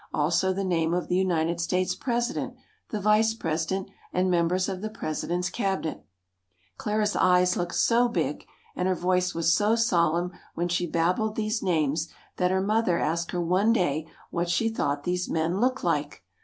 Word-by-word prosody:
Also 165 +5 +2
the 195 +1 -2
name 170 -2 +1
of 180 - -2
the 180 - +1
United 170 -2 +1
States' 180 +2 0
president, 240 -1 -2 0.3
the 215 - -3
vice 215 +2 +3
president, 165 +1 -2 0.2
and 185 +1 +1
members 175 +2 +2
of 190 -2 -4
the 215 - -3
president's 175 -2 -3
cabinet. 190 -7 -2 0.8
Clara's 210 0 0
eyes 180 0 +4
looked 175 -1 -2
so 240 +1 +3
big, 235 - -2 0.3
and 180 - 0
her 185 - +2
voice 180 +1 0
was 165 0 +3
so 210 +3 +3
solemn 175 -6 +2 0.2
when 175 +1 0
she 175 0 0
babbled 180 +7 0
these 215 +1 -1
names 160 -3 0 0.3
that 180 -1 +2
her 190 +1 +1
mother 210 -3 +2
asked 170 +1 -1
her 180 - -2
one 190 +6 +3
day 160 -8 0 0.2
what 175 0 -1
she 225 +6 +2
thought 145 -10 -1
these 180 0 -1
men 165 +4 0
looked 255 +1 +1
like. 150 - -1
180 Hz, 170 wpm, -26 LUFS, 170-205 Hz, 0.8 s, eyes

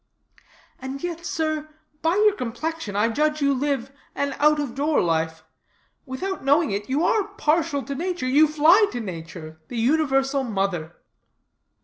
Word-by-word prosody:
"And 265 +1 -6
yet, 340 -1 -4
sir, 310 -1 -2 0.3
by 325 +3 +2
your 420 0 +4
complexion, 250 - -4
I 210 +3 +2
judge 300 +5 0
you 280 -1 +2
live 270 -1 -1 0.2
an 280 -1 -1
out 300 +1 +4
of 280 -5 -3
door 290 +4 +1
life; 160 -1 0 0.6
without 370 +9 -4
knowing 285 -1 +3
it, 205 +3 -3
you 285 +5 +1
are 420 -3 +2
partial 305 -5 +1
to 280 - -5
nature; 345 0 -3
you 295 +4 +5
fly 320 +8 +5
to 245 - -3
nature, 165 -5 -8
the 245 - -6
universal 270 +1 +2
mother." 195 -7 -2
280 Hz, 150 wpm, -24 LUFS, 230-315 Hz, 0.6 s, you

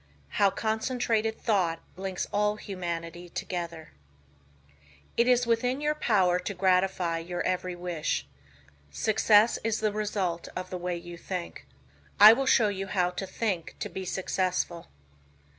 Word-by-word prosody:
HOW 200 - +7
CONCENTRATED 220 +1 -1
THOUGHT 180 -8 +1 0.2
LINKS 190 0 -3
ALL 210 +1 +2
HUMANITY 175 -3 -5
TOGETHER 170 -3 -5 1.2
It 235 - +3
is 245 -1 +4
within 245 +3 +1
your 300 +1 +1
power 190 -11 +2
to 190 +2 -5
gratify 180 -2 +1
your 175 +1 -4
every 180 0 -1
wish. 170 - -2 0.6
Success 215 - +3
is 225 -1 0
the 215 -1 +1
result 200 -5 -2
of 185 0 -5
the 180 - -4
way 175 0 -2
you 170 0 -9
think. 170 - -6 0.5
I 210 +2 +11
will 270 +3 -1
show 220 -4 +5
you 195 -1 -4
how 180 -3 +1
to 195 +2 -5
think 185 -5 -3
to - - -4
be 190 - -5
successful. 185 -2 -2
190 Hz, 140 wpm, -28 LUFS, 175-215 Hz, 1.2 s, I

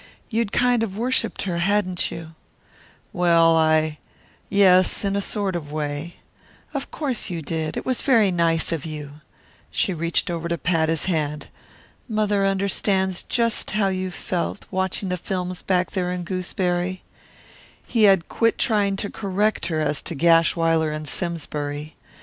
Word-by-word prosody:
You'd 225 -2 0
kind 245 -2 +2
of 205 -3 -3
worshiped 250 +3 0
her, 175 -3 -2
hadn't 185 -1 +1
you?" 165 -1 -8 0.8
"Well, 170 -2 +4
I 155 -1 +2 0.5
yes, 190 -1 +4
in 200 0 0
a 200 - +1
sort 200 -2 -2
of 150 -4 -5
way 150 +2 -4 0.3
" - - -29
"Of 280 -1 -4
course 265 -8 -2
you 170 -3 -4
did; 155 0 -3
it - - -4
was 255 -2 0
very 225 -8 +4
nice 165 -2 +1
of 165 -4 -2
you 150 -2 -7 0.2
" - - -31
She 190 - 0
reached 170 +2 0
over 170 -1 -3
to 170 0 -1
pat 165 -2 +1
his 160 -1 0
hand. 150 -4 -2 0.6
"Mother 210 -2 +1
understands 190 -1 +1
just 230 -2 0
how 200 -2 +2
you 185 0 -2
felt, 180 +1 -3
watching 190 0 -1
the 180 - -1
films 180 0 -4
back 180 -1 0
there 180 -2 -1
in 180 0 -3
Gooseberry 180 0 -2 0.4
" - - -23 0.3
He 225 -3 +3
had 190 -4 +4
quit 230 0 +1
trying 205 -3 +2
to 200 +1 -2
correct 200 -2 -1
her 160 -2 -1
as 150 -1 -1
to 170 - -4
Gashwiler 165 0 +3
and 155 0 -5
Simsbury. 150 -3 -3
180 Hz, 160 wpm, -23 LUFS, 165-200 Hz, 0.8 s, Well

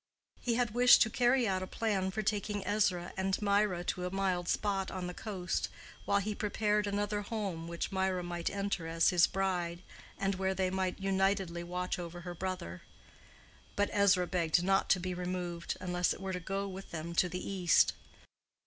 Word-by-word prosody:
He 235 -2 0
had 240 -2 +1
wished 245 +1 +7
to 225 - -3
carry 245 0 +3
out 190 -1 0
a 185 - -4
plan 200 -4 0
for 215 +3 -3
taking 205 -1 -1
Ezra 185 -4 +1
and 190 0 0
Mirah 200 -3 +2
to 180 0 -2
a 180 - -1
mild 185 -2 0
spot 195 -2 0
on 185 -1 -4
the 180 - -4
coast, 185 -4 -3 0.4
while 200 - +3
he 205 +1 -1
prepared 210 0 0
another 205 +1 -1
home 200 -6 -4
which 170 +3 -3
Mirah 190 -1 0
might 175 -1 -2
enter 200 -4 -2
as 165 0 +3
his 175 -2 +5
bride, 180 -2 -2 0.3
and 195 0 0
where 190 0 -1
they 185 -1 0
might 190 0 -1
unitedly 195 -2 0
watch 180 +1 -3
over 175 0 -6
her 175 0 -6
brother. 175 - -5 0.9
But 205 0 +1
Ezra 200 -3 +4
begged 175 -1 +1
not 195 +1 +2
to 185 - +4
be 185 +1 -3
removed, 180 -1 -3
unless 180 -1 0
it - - -12
were 190 -1 -4
to 180 - -2
go 195 +3 -3
with 195 0 -8
them 170 0 -5
to 180 +1 +2
the 180 +1 -5
East. 185 -4 +4
190 Hz, 185 wpm, -32 LUFS, 180-200 Hz, 0.9 s, wished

